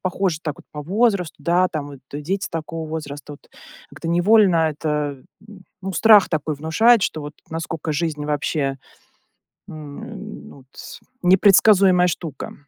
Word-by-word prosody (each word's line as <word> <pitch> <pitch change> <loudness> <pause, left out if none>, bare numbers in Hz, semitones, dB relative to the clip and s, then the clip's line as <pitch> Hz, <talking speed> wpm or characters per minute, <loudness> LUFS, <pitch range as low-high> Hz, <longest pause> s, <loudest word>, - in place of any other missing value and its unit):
похожи 185 -2 -1
так 150 -3 -3
вот - - -15
по 150 - -6
возрасту, 195 - 0
да, 175 +4 +2
там 150 -3 -5
вот 140 -2 -11 0.2
и 150 - -5
дети 190 +5 -2
такого 165 0 -5
возраста, 150 -2 -7
вот. - - -21 0.4
Как-то - - -9
невольно 185 +1 +4
это 150 -2 -3 0.3
м, 190 -3 -14 0.2
ну, 195 0 -4
страх 210 +2 +6
такой 155 -1 -2
внушает, 190 +10 +3
что 155 - -1
вот 150 - -7 0.2
насколько 160 -1 -4
жизнь 150 -1 -2
вообще, 145 -1 -1 0.9
м, 170 +8 -9
ну, 135 -2 -15
тс - - -11 0.2
непредсказуемая 190 0 +5
штука. 165 -2 -5
165 Hz, 145 wpm, -21 LUFS, 150-190 Hz, 0.9 s, страх